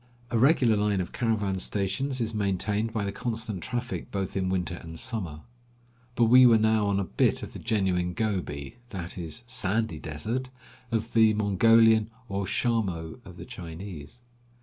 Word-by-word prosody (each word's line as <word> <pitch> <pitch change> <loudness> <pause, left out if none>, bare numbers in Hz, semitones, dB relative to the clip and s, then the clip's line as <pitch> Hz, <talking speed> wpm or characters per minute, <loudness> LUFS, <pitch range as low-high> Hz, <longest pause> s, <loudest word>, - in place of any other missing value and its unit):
A 115 - +2
regular 130 -4 +5
line 105 -1 +1
of 90 - -3
caravan 105 -5 0
stations 105 +9 -1
is 115 -1 -2
maintained 105 +2 0
by 110 -2 -2
the 100 - -2
constant 110 -4 -4
traffic 120 +5 -4
both 95 -2 -3
in 95 -1 0
winter 90 -1 -1
and 80 -1 -9
summer. 95 -11 -4 0.7
But 120 - +3
we 125 +3 +7
were 115 -2 +6
now 110 -1 +2
on 100 -1 +1
a - - 0
bit 90 - +1
of - - -7
the - - -7
genuine 95 -5 0
Gobi 95 - -3
— 120 - -31
that 85 -1 -5
is, 85 +6 -5
"Sandy 115 -2 0
Desert" 110 - -4 0.2
— 125 - -25
of 115 0 -2
the 110 -2 +5
Mongolian, 110 +2 +4 0.2
or 100 -1 -2
"Shamo" 95 -9 -1
of - - -12
the - - -8
Chinese. 85 +3 -9
105 Hz, 170 wpm, -27 LUFS, 95-115 Hz, 0.7 s, we